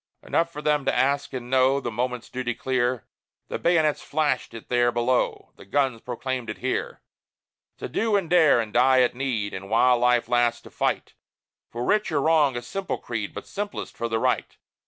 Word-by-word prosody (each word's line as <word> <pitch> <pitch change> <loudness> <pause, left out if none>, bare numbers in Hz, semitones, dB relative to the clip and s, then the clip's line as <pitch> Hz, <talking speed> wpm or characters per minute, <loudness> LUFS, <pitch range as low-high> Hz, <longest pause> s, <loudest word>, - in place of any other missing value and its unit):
Enough 170 0 0
for 150 -1 -8
them 150 -1 +2
to - - +1
ask 140 +2 +1
and 125 -2 -6
know 130 +2 +3
The 120 -3 -4
moment's 125 +1 -3
duty 125 -2 -3
clear 125 -1 -1 0.4
The - - -3
bayonets 160 -3 +2
flashed 150 -5 -1
it 115 - -10
there 120 -1 +2
below, 120 +1 0
The - - -13
guns 130 +1 0
proclaimed 125 -1 -4
it 105 - -5
here: 130 +1 -3 0.8
To - - -5
do 220 - 0
and 195 -4 +1
dare, 160 -7 +5
and 110 -2 -3
die 130 +1 +5
at 125 - +2
need, 120 -6 -2
But 95 +1 -7
while 120 +2 +4
life 125 -1 +3
lasts, 120 -1 +2
to - - -14
fight - - -1 0.6
For 120 +1 -5
right 210 +7 +1
or 150 - +1
wrong 150 -4 +3
a 120 - -5
simple 190 +10 -4
creed, 110 -4 -4
But - - -8
simplest 205 0 -5
for 115 - -3
the 115 - 0
right. - - -1
125 Hz, 195 wpm, -25 LUFS, 120-145 Hz, 0.8 s, dare